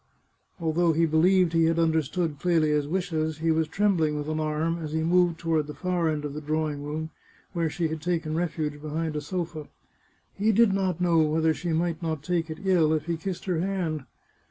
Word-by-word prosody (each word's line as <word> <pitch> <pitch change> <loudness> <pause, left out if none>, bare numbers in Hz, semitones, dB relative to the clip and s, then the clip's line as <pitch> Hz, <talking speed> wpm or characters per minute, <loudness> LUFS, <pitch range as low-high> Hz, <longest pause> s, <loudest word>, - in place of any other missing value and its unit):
Although 165 0 +2
he 165 +2 +3
believed 170 +2 +3
he 165 -1 +4
had 165 0 +2
under 160 -1 +3
stood 155 0 -3
Clelia's 155 -4 +2
wishes, 160 -3 -1
he 165 +1 +1
was 160 0 +1
trembling 165 -5 +1
with 145 0 -4
alarm 155 +2 -1
as 155 -2 -5
he 160 0 0
moved 175 0 +3
toward 160 -3 0
the 150 - -7
far 180 0 0
end 150 -1 -2
of 145 - -4
the 150 - -5
drawing 155 -1 -1
room, 155 +2 -4 0.4
where 165 -3 0
she 165 +2 -1
had 160 -1 -4
taken 165 -2 -1
refuge 155 -3 -2
behind 155 +1 -3
a 150 - -2
sofa. 165 -2 -4 0.7
He 210 +3 +2
did 220 -1 +4
not 185 -3 -1
know 170 -2 +3
whether 160 +1 +2
she 175 +3 -5
might 165 0 0
not 160 -3 -3
take 170 -1 -1
it 160 +5 -7
ill 170 -5 +4
if 155 -1 -1
he 170 0 -1
kissed 175 +2 -5
her 180 -4 0
hand. 170 -6 -2
160 Hz, 205 wpm, -26 LUFS, 155-175 Hz, 0.7 s, he